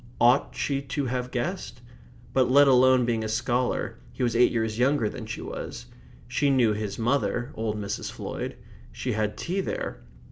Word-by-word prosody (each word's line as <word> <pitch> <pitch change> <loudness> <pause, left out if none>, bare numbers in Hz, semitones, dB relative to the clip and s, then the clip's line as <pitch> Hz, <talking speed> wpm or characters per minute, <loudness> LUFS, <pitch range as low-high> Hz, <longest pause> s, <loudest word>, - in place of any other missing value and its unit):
Ought 125 +3 +4
she 140 -1 -1
to 140 +1 -3
have 125 0 -2
guessed? 120 -1 -4 0.5
But 130 -1 +3
let 140 +2 +7
alone 130 -1 +5
being 115 -2 0
a - - -2
scholar 125 +2 -1
he - - -4
was 120 -1 +1
eight 125 +1 +5
years 110 -1 -1
younger 130 -2 +3
than - - -6
she - - -5
was. - - -6 0.4
She 130 +4 +1
knew 125 -5 +4
his 105 -1 -4
mother 120 +1 0
old 110 -1 -2
Mrs. 100 0 -4
Floyd. - - -5 0.3
She 125 - -3
had 105 -1 -1
tea 185 +3 -1
there. - - -4
125 Hz, 175 wpm, -26 LUFS, 110-135 Hz, 0.5 s, let